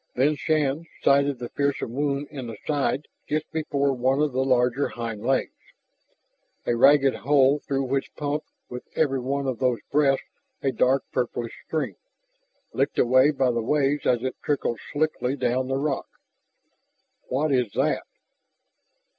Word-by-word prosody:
Then 145 +4 +3
Shann 155 0 0 0.2
sighted 140 0 +3
the 120 -1 -6
fearsome 140 -4 -1
wound 140 +1 -1
in 135 -5 -6
the 115 - -7
side 145 -1 0 0.2
just 155 +1 0
before 140 -3 0
one 130 +2 +1
of 150 -1 +2
the 130 +1 +1
larger 125 +1 +2
hind 115 -3 -5
legs, 135 +2 0 1.1
a 120 - +1
ragged 135 +2 +5
hole 140 0 +3
through 135 -1 -2
which 135 +1 -2
pumped 150 +1 -3 0.2
with 125 0 -7
every 135 -4 +2
one 140 +2 -2
of 130 -4 -2
those 125 -2 +2
breaths 140 -2 +3 0.4
a 135 - +2
dark 130 +1 +2
purplish 120 -1 -2
stream, 160 -1 -2 0.8
licked - - 0
away 130 +3 +5
by 135 -4 +2
the 115 -1 -1
waves 145 +3 +1
as 120 -1 +2
it 130 -1 -2
trickled 140 -5 -1
slickly 145 -3 0
down 130 -1 0
the 135 0 0
rock. 140 -1 -1 1.2
"What 145 +4 0
is 125 -5 +1
that?" - - 0
135 Hz, 150 wpm, -25 LUFS, 125-145 Hz, 1.2 s, ragged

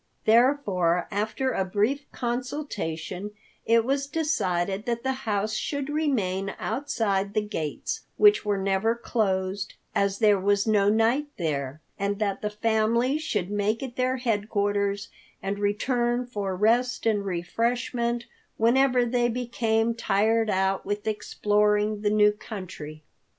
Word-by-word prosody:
Therefore 215 -8 +3
after 220 +6 -1
a 190 - 0
brief 215 +10 -1
consultation, 210 - -4 0.3
it 230 0 +4
was 275 +2 0
decided 200 - -1
that 235 -1 -1
the 265 - +1 0.2
house 210 +1 0
should 285 +5 -2
remain 200 -11 -1
outside 215 -6 -1
the 215 - +1
gates, 155 -7 -3 0.2
which 420 0 +6
were 205 -1 0
never 195 +4 +1
closed, 200 -4 -1 0.2
as 200 0 +1
there 210 -2 +4
was 200 +1 +2
no 205 -2 +3
night 230 +7 +2
there; 145 -3 -2 0.2
and 200 +1 -1
that 200 -2 -1
the 210 - -1
family 225 +5 +1
should 205 - -2
make 210 +4 0
it 250 -2 -6
their 255 +1 0
headquarters 205 -3 -1 0.3
and 200 +1 -3
return 240 +4 0
for 205 -6 -3
rest 235 +6 +2
and 210 -3 +2
refreshment 235 +6 -1 0.3
whenever 250 +2 +4
they 240 0 +1
became 230 -1 0
tired 225 0 +1
out 190 0 +1
with 205 +1 -3
exploring 210 0 +1
the 210 - +2
new 210 0 +5
country. 185 -8 -8
215 Hz, 130 wpm, -26 LUFS, 200-240 Hz, 0.3 s, which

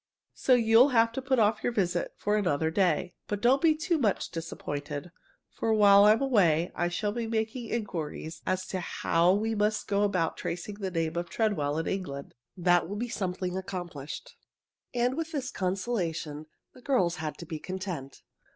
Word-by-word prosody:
So 255 - +3
you'll 230 +3 +6
have 230 0 +5
to 265 - -4
put 260 0 +1
off 220 -1 +3
your - - +1
visit 180 -6 -1
for 205 0 0
another 160 -6 +1
day. 180 -1 +1
But 205 - -2
don't 255 +5 +4
be 320 -2 +4
too 330 +1 0
much 215 -7 0
disappointed, 150 -1 -5 0.4
for 225 - -1
while 200 -1 +7
I'm 215 +5 +5
away 180 - +3
I 175 - 0
shall 205 +4 -1
be 230 +1 -3
making 225 +2 -2
inquiries 165 -7 -4
as 185 0 0
to 190 - -2
how 170 0 +2
we 220 +2 0
must 210 0 0
go 200 0 +1
about 185 -5 +1
tracing 180 +4 -5
the 195 -2 -2
name 165 -2 -2
of 175 0 -3
Treadwell 155 -10 0
in 160 - -1
England. 140 -8 -4 0.2
That 175 -1 +3
will 205 - -4
be 240 +3 -3
something 185 -4 -3
accomplished." 175 -6 -6 0.6
And 245 +1 +1
with 325 +1 -4
this 275 -2 -3
consolation 180 -6 -2 0.3
the 255 - -16
girls 185 -10 +1
had 155 -1 -4
to 170 - -8
be 155 -1 -5
content. 185 -7 -6
190 Hz, 180 wpm, -29 LUFS, 170-225 Hz, 0.6 s, while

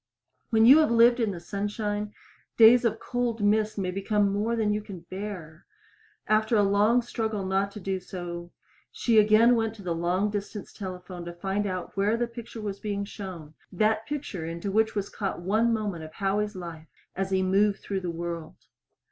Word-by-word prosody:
When 225 -1 +4
you 275 +6 +9
have 310 - +4
lived 235 +1 +5
in 225 -3 +1
the 185 -4 -5
sunshine, 205 +2 -3 0.5
days 235 +2 +7
of 225 -1 0
cold 240 -3 -2
mist 215 +1 +2
may 185 -2 -1
become 200 +1 +1
more 215 +3 0
than 215 -2 +1
you 210 - -1
can 195 -4 -9
bear. 180 -3 -8 0.6
After 215 +2 +2
a 205 - +4
long 210 +5 +3
struggle 220 -4 -3
not 195 +1 +1
to 210 - -7
do 190 0 -2
so, 175 -1 -7 0.4
she 230 -3 +3
again 215 +3 +6
went 225 -1 -1
to 205 - -12
the 175 -2 -1
long 180 +5 0
distance 205 0 -5
telephone 180 -2 -7
to 175 - -6
find 195 +3 -2
out 185 -2 -5
where 205 +3 +2
that 235 0 -2
picture 230 -1 -8
was 200 -2 -4
being 200 -1 -3
shown 180 -7 -8 0.2
that 215 +3 +1
picture 275 - -4
into 170 +4 -4
which 220 +2 +2
was 200 -1 -1
caught 195 -4 -4
one 215 +6 +2
moment 205 -7 -2
of 155 0 -10
Howie's 205 +1 -1
life 165 -3 -8 0.3
as 190 0 -2
he 190 -1 +1
moved 195 +2 +2
through 195 -1 -3
the 180 - -3
world. 170 -1 -5
205 Hz, 190 wpm, -27 LUFS, 185-220 Hz, 0.6 s, you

